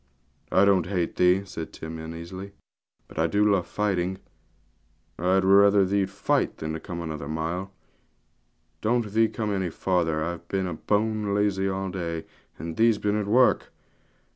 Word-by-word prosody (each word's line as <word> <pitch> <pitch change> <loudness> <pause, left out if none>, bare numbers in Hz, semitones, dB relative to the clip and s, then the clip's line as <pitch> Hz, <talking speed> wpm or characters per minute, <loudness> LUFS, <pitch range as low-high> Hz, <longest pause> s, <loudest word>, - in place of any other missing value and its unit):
'I 95 - +5
don't 95 -3 +4
hate 90 -3 -1
thee,' 90 +2 +4
said 80 -4 -7
Tim 80 0 -7
uneasily, 85 +5 -8 0.5
'but - - -8
I 80 - +3
do 105 +5 +2
love 100 -4 +2
fighting; 95 -3 -1 1.0
I'd 95 +2 +2
liever 100 +1 +6
thee'd 100 0 +1
fight 100 +1 0
than 80 +1 -4
come 85 +1 -6
another 75 -3 -5
mile. 85 +5 -3 1.1
Don't 115 -1 0
thee 115 0 +4
come 105 -2 -3
any 95 -2 -1
farther, 80 -3 0
I've 85 +1 -5
been 95 -3 -2
bone 105 -1 +1
lazy 100 -2 +1
all 95 0 -3
day, 85 -3 -4 0.3
and 80 -1 -6
thee's 115 -1 +4
been 105 0 0
at 105 -1 -1
work. 125 +4 +3
95 Hz, 150 wpm, -26 LUFS, 85-100 Hz, 1.1 s, liever